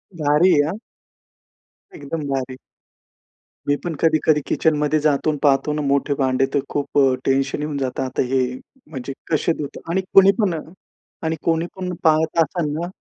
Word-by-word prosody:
भारी 150 +4 +3
आहे 145 0 +3
हां. 195 - -4 1.2
एकदम 145 +1 -5
भारी! 130 -1 -3 1.1
मी 145 - +3
पण 170 -2 -3
कधी-कधी 155 -1 +3
किचन 160 -1 +1
मध्ये 150 +1 +1
जातो 150 0 +1
आणि 150 - -1
पाहतो 145 +1 +3
ना 150 - -2
मोठे 140 +1 +1
भांडे 130 0 +2
तर 140 - +3
खूप 145 0 -1 0.3
टेन्शन 135 +2 0
येऊन 150 -1 -3
जातं 130 -1 -2
आता 130 - -2
हे 130 - +3 0.5
म्हणजे 135 -3 -6 0.2
कसे 160 +2 +2
धुत 145 -1 -6
आणि 190 +3 +1
कोणी 195 0 +8
पण 180 -6 0 0.6
आणि 160 0 0
कोणी 165 0 +1
पण 185 -1 -4
पाहत 160 0 +2
असेल 155 -1 -3
ना 170 +1 -3
150 Hz, 160 wpm, -21 LUFS, 140-160 Hz, 1.2 s, कोणी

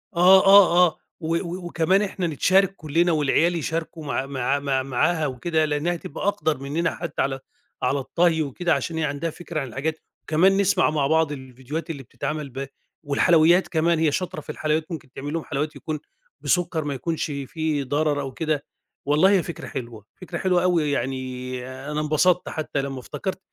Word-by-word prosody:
آه، 185 +2 +7
آه، 190 -3 +7
آه، 160 - -6 0.2
و 165 +1 -1
و 175 +1 -4
وكمان 175 +3 +2
إحنا 190 -3 -2
نتشارك 190 +5 +3
كلنا 165 +2 +1
والعيال 160 +3 +2
يشاركوا 165 0 -3
مع 140 -2 -1
مع 135 0 -1
مع 135 -2 0
معاها 150 +5 +1
وكده 155 +5 0
لأنها 150 +4 0
تبقى 165 +2 -5
أقدر 155 -6 0
مننا 145 +5 -2
حتى 170 -3 -3
على 135 0 -1 0.4
على 135 +3 +1
الطهي 165 +4 +1
وكده 160 +4 0
عشان 155 +4 -2
هي 160 - 0
عندها 150 +3 -2
فكرة 170 0 -5
عن 135 - -4
الحاجات، 150 +6 -3 0.2
وكمان 185 +5 +3
نسمع 200 -1 +3
مع 150 -3 +1
بعض 160 0 +2
الفيديوهات 130 +3 -6
اللي 140 -4 -5
بتتعمل 140 +4 -4
ب 135 +2 -5 0.4
والحلويات 165 +4 +4
كمان 165 0 +1
هي 160 -2 +3
شاطرة 185 +4 -3
في - - -18
الحلويات 155 +2 -1
ممكن 155 -6 -7
تعمل 145 +3 -6
لهم 165 -1 -2
حلويات 150 +1 -3
يكون 150 +2 -4 0.4
بسكر 175 -3 +1
ما 145 -1 -2
يكونش 160 +5 -2
فيه 145 +1 -2
ضرر 145 +2 0
أو 135 -1 -5
كده، 155 0 -2 0.4
والله 150 +6 +4
هي 190 -4 +3
فكرة 170 - -7
حلوة، 115 -4 -7 0.2
فكرة 175 -1 -5
حلوة 180 -1 +2
أوي 170 -5 +2
يعني 130 -2 -3 0.3
أنا 150 0 -1
انبسطت 155 +4 +2
حتى 155 -3 -2
لما 135 -1 -5
افتكرت 190 +9 -5
155 Hz, 180 wpm, -24 LUFS, 140-170 Hz, 0.4 s, آه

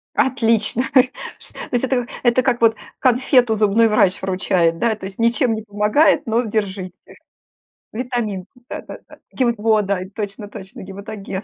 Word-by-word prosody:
Отлично! 230 -2 +2
То 260 - +6
есть 255 0 -5
то - - -8
есть 245 0 +1
это 250 -2 0 0.2
это 240 +1 +4
как 250 -2 +1
вот 225 -1 +5 0.2
конфету 250 -2 +3
зубной 215 +2 +3
врач 200 -3 +2
вручает, 185 -3 +1
да? 230 -2 +1
То 200 - -11
есть 190 0 -7
ничем 235 +1 +2
не 220 - -4
помогает, 210 +8 +2
но 230 +1 +1
держите. 200 -5 -3 1.0
Витаминку, 220 -6 -3 0.2
да-да-да. - - -9
Гема 240 -3 +1
Во, 215 0 +3
да, 200 -1 -1 0.2
точно-точно, 205 -2 -7
гематоген. 195 0 -7
220 Hz, 145 wpm, -20 LUFS, 200-240 Hz, 1.0 s, То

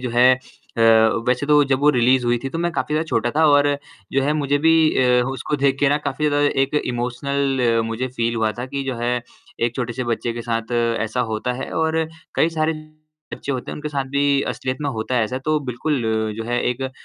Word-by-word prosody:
है 125 +2 +6
अ, 130 -2 -11 0.5
वैसे 125 +3 +1
तो 150 0 +5
जब 135 -1 +1
वो 150 +1 +5
रिलीज़ 125 -1 +3
हुई 120 0 +2
थी - - -1
तो 165 - -4
मैं 170 +1 0
काफ़ी 150 - -2
ज़्यादा 155 +1 +1
छोटा 115 -2 0
था 160 - +4
और 145 -1 +5 0.4
जो 135 0 +2
है 145 - +1
मुझे 145 -2 0
भी 160 +2 +4 0.5
अ, - - +2
उसको 135 +3 -3
देख 135 -1 +1
के 145 - +4
ना 145 +1 +2
काफ़ी 150 +2 0
ज़्यादा 145 0 +2 0.2
एक 135 +2 -2
इमोशनल 130 +3 -1 0.2
अ, - - +2
मुझे 115 +3 -3
फ़ील 115 -2 -2
हुआ 110 -1 0
था 125 - -3
कि 140 +1 -4
जो 135 -1 -2
है 120 +1 -1 0.4
एक 120 0 0
छोटे 120 -1 -2
से 125 +2 -4
बच्चे 120 0 -2
के 120 0 -6
साथ 115 0 -3 0.3
ऐसा 115 +3 -1
होता 110 +3 -2
है - - -7
और 160 0 +1 0.3
कई 160 - +3
सारे 160 0 0 0.6
बच्चे 140 - -4
होते 125 - -4
हैं - - -5
उनके 150 0 -5
साथ 140 -2 -2
भी 140 0 +2
असलियत 130 0 -3
में 145 - -1
होता 110 +1 -3
है 115 - +3
ऐसा 125 +4 -4
तो 155 0 +2
बिल्कुल 130 +2 -2 0.3
जो 115 - -4
है 120 +1 -1
एक 125 +2 -4
अ, 130 - -3
130 Hz, 230 wpm, -21 LUFS, 120-145 Hz, 0.6 s, है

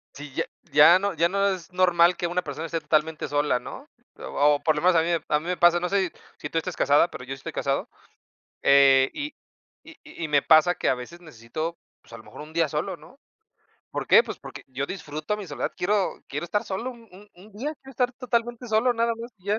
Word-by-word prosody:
Si 145 -1 -10
ya - - -1 0.3
ya 170 +5 +7
no 200 0 -1
ya 170 +1 +2
no 200 +1 +1
es 185 -1 -5
normal 180 -1 +4
que 175 - -1
una 175 +1 -1
persona 150 +2 -5
esté 165 0 -2
totalmente 155 +1 0
sola, 145 -3 +1
¿no? 270 - -10 0.3
O 145 +1 +2
o 145 - -4
por 155 - +2
lo 150 - -2
menos 180 0 +4
a 165 - +5
mí 165 - -1 0.2
a 150 - +2
mí 155 - -12
me 180 0 -2
pasa, 175 0 +5
no 180 +1 -2
sé, 195 -3 +1 0.3
si - - -6
tú - - -3
estás 175 +2 -2
casada, 145 +4 +3
pero 125 - -9
yo 125 - -13
sí - - -5
estoy - - -7
casado, 135 0 -2 0.7
eh, 135 -1 +6
y 290 +1 -5 0.5
y 315 0 -14 0.3
y - - -4
me 145 -2 +3
pasa 160 +4 +5
que - - 0
a 130 - +2
veces 170 +8 -10
necesito, 155 +4 -6 0.2
pues, - - -19
a - - -7
lo 110 - -14
mejor - - -12
1 155 +1 -11
día 165 -1 +2
solo, 150 +3 -3
¿no? 255 - -18 0.7
¿Por - - -4
qué? 470 - +7
Pues - - -7
porque - - -10
yo 135 +2 -4
disfruto 155 +2 -4
mi 205 -3 -7
soledad, 145 - -4
quiero 200 +1 0
quiero 145 +4 -4
estar 205 +5 -1
solo 215 +7 -4
un 235 -3 -15
un 205 +3 -15
un 195 +4 -17
día, 280 +10 -4
quiero 270 - -13
estar 250 -1 0
totalmente 240 -1 -2
solo, 225 +2 +2
nada 230 0 0
más, 235 +2 -8
y 185 - -23
ya. 210 +2 +1
175 Hz, 240 wpm, -25 LUFS, 150-210 Hz, 0.7 s, ya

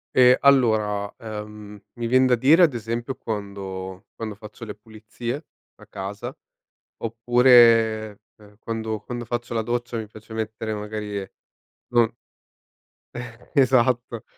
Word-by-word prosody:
Ehm, 125 0 +7
allora, 110 -7 +3
ehm, 105 -2 -8 0.2
mi 120 -1 -2
vien 130 +2 +4
da 125 -1 +4
dire 150 +9 +5
ad 150 -6 +4
esempio 120 +3 -3
quando 95 -4 -6
quando 110 -2 -5
faccio 105 +2 -12
le 105 - -6
pulizie, 115 +6 -7 0.3
a - - -16
casa, 100 +2 -6 0.6
oppure, 115 -2 +4 0.2
ehm, 105 -1 -19
quando 110 -1 -3
quando 120 -1 -6
faccio 120 0 -4
la 115 - +1
doccia 120 +1 -2
mi 110 -1 -5
piace 110 +1 -13
mettere 110 0 -3
magari, 105 -1 -4 0.6
non 120 -2 +3 1.0
Eh, 120 0 -9
esatto. 125 -4 +2
115 Hz, 125 wpm, -24 LUFS, 105-120 Hz, 1.0 s, Ehm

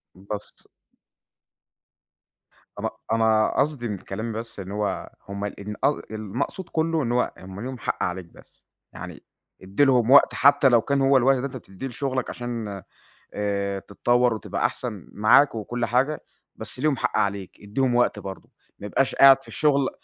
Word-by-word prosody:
بس 100 +2 -8 2.1
أنا - - -1 0.2
أنا 110 -1 +3
قصدي 140 -4 0
من 105 -2 -3
كلامي 110 +5 -5
بس 115 -2 -7
إن 95 0 -7
هو 105 -2 -2 0.2
هُم 100 +1 -4
ال 105 +4 -5
أ 145 - +2
المقصود 110 - -4
كُلّه 160 -1 0
إن 120 - -1
هو 125 - +1
هُم 95 +2 -9
ليهم 130 +1 -5
حق - - -2
عليك 90 0 -3
بس، 85 - -20 0.3
يعني - - -9 0.4
ادّي 95 +9 +1
لهم 125 -2 +3
وقت 140 - +7
حتى 140 -1 +5
لو 120 -2 +5
كان 140 -1 0
هو 135 0 +5
الوقت 135 +2 +4
اللي 130 +2 -2
أنت 130 -1 -5
بتدّيه 105 +4 -8
لشُّغلك 130 0 -2
عشان 115 -6 -5 0.5
آآ 100 -1 -1
تتطوّر 120 +4 +1
وتبقى 110 - -1
أحسن، - - -6
معاك 110 +6 +5
وكُلّ 120 +2 -3
حاجة، 135 +6 +1 0.4
بس - - -7
ليهم 150 -2 +2
حق - - -1
عليك، 100 -2 -2
ادّيهم 120 +5 0
وقت 120 -3 +2
برضه، 95 -1 -8 0.3
ما 100 - -7
يبقاش 135 +5 +1
قاعد 135 0 +7
في - - -15
الشُّغل 140 -3 +2
115 Hz, 160 wpm, -24 LUFS, 100-135 Hz, 2.1 s, وقت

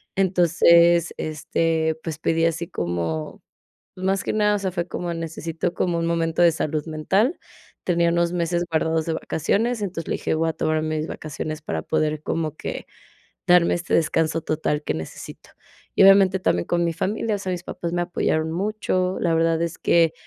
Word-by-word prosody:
entonces, 170 -2 +4
este, 160 +1 -1
pues 160 -3 -4
pedí 165 0 +1
así 165 +1 -1
como, 85 -3 -3 0.5
más 190 +1 0
que - - -1
nada, 210 -1 +3
o - - -2
sea, 190 -1 -1
fue 175 0 -2
como: 175 -1 -4
"Necesito 165 0 -4
como 175 -2 0
un 165 - -1
momento 165 0 0
de 170 -1 +6
salud 155 -1 -2
mental", 190 - 0 0.5
tenía 170 -1 +2
unos 170 0 +1
meses 175 0 0
guardados 160 0 0
de 165 - -1
vacaciones, 210 +10 -1
entonces 175 -5 -4
le - - 0
dije: - - -2
"Voy 165 +1 +1
a - - -6
tomarme 155 0 -1
mis 155 - -3
vacaciones 155 0 -5
para 80 - -3
poder 155 - -1
como 155 -1 -2
que - - -6 0.6
darme 175 -1 +5
este 175 0 -4
descanso 160 0 +1
total 150 -1 -1
que - - -1
necesito", 80 0 -9 0.4
y - - +5
obviamente 195 -1 +6
también 90 - +1
con 175 0 +1
mi 170 - +1
familia, 210 +5 -1
o - - -5
sea, 190 -1 -3
mis 175 -1 -5
papás 170 -1 -5
me 175 - 0
apoyaron 160 -2 -1
mucho, 185 0 -1
la 170 -1 +2
verdad 165 0 +2
es 170 0 -2
que 165 -2 +3
165 Hz, 180 wpm, -23 LUFS, 160-175 Hz, 0.6 s, de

